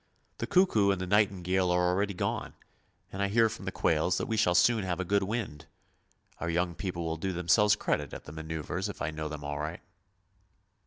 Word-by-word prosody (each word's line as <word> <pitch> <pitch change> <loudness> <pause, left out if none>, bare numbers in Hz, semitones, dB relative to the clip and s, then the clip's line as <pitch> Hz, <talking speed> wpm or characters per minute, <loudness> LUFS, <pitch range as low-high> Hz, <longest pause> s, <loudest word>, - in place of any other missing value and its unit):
The - - -2
cuckoo 180 - +4
and 100 -2 +1
the 95 - -2
nightingale 95 -2 +2
are 90 0 +2
already 100 +2 0
gone, - - -3 0.6
and 95 - -4
I 100 - +2
hear 115 +2 +3
from 110 -3 -8
the 95 - -2
quails 85 +1 +1
that - - -1
we 115 - -2
shall 95 -5 +3
soon 115 +2 +4
have 90 -1 -2
a 95 - -1
good 100 +3 +2
wind. 95 -7 -4 0.7
Our 85 - -2
young 85 +1 0
people 85 -2 -4
will 80 0 -2
do 95 +4 -2
themselves 105 +5 +4
credit 75 -8 -1
at - - -8
the - - -10
manoeuvres 80 -1 -4
if - - -8
I - - -2
know 80 0 -4
them 75 -1 -7
aright! 75 +3 -4
90 Hz, 205 wpm, -29 LUFS, 80-100 Hz, 0.7 s, cuckoo